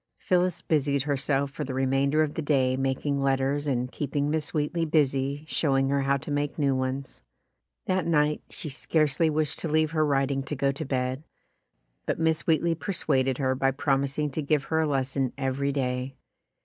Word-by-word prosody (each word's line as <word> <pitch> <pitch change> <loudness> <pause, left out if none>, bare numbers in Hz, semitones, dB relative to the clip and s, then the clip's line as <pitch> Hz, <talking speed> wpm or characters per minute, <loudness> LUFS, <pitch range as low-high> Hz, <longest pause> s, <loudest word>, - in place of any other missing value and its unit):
Phillis 180 -1 0
busied 140 -3 +1
herself 140 -1 0
for 150 - -4
the 130 -2 -4
remainder 135 +3 +2
of 150 -1 -3
the - - -3
day 135 -4 +2
making 135 +1 -1
letters 135 +2 +1
and 125 -2 -1
keep 145 -1 -5
ing 145 +1 +1
Miss 155 -2 -2
Wheatley 155 +2 -1
busy 140 -2 +1
showing 135 -4 +1
her 140 0 +1
how 140 0 +2
to 140 - -7
make 145 0 -1
new 140 -3 +2
ones. 130 +1 -3 0.6
That 185 -2 0
night 150 -2 +2
she - - -6
scarcely 155 +2 +1
wished 155 -1 -1
to - - -3
leave 155 0 +2
her 155 -1 +2
writing 135 -2 +1
to 135 +2 -4
go 140 0 +1
to 140 +3 -5
bed, 130 +1 -2 0.8
but - - 0
Miss 160 -1 0
Wheatley 165 +1 +3
per 195 +5 -4
suaded 130 -6 +1
her 130 -2 +1
by 135 +1 +1
promising 140 +1 0
to 155 - -2
give 150 -1 +1
her 160 - +3
a 160 - +2
lesson 135 -2 -1
every 135 +1 -1
day. 130 -1 -2
140 Hz, 190 wpm, -27 LUFS, 135-155 Hz, 0.8 s, Wheatley